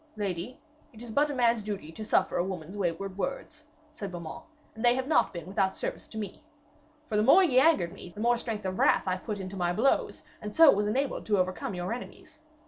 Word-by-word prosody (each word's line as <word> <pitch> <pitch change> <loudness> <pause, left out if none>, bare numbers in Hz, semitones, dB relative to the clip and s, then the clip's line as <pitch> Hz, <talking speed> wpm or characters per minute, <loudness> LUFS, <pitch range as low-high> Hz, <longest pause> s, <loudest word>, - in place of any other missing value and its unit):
'Lady, 200 +4 -4 0.3
it 225 +1 -11
is 235 - -8
but 290 +6 +2
a 290 - -3
man's 235 -2 +3
duty 200 -6 -5
to 215 - -8
suffer 195 -3 +1
a - - +2
woman's 180 -1 -6
wayward 190 +1 -3
words,' 300 +5 -4 0.3
said 200 -10 -6
Beaumains, 170 -3 -7 0.3
'and 220 - -8
they 240 0 +5
have 260 0 -2
not 310 - +3
been 170 -3 -7
without 190 +1 0
service - - -5
to 220 - -10
me. 210 +5 -6 0.6
For 220 - -4
the 210 - +4
more 315 - +7
ye 260 -8 +4
angered 265 - +3
me 190 - -10
the 175 - -12
more 240 +1 +2
strength 220 -4 -4
of 185 0 -3
wrath - - +3
I 185 0 +1
put 205 +2 -5
into 190 0 -6
my 175 -2 0
blows, 245 +9 +1 0.2
and 210 0 -6
so 325 -3 +9
was 205 +1 +1
enabled 265 +5 -1
to 210 -2 +3
overcome 185 +1 -1
your 180 +4 -3
enemies. 305 +5 -10
210 Hz, 225 wpm, -29 LUFS, 185-245 Hz, 0.6 s, so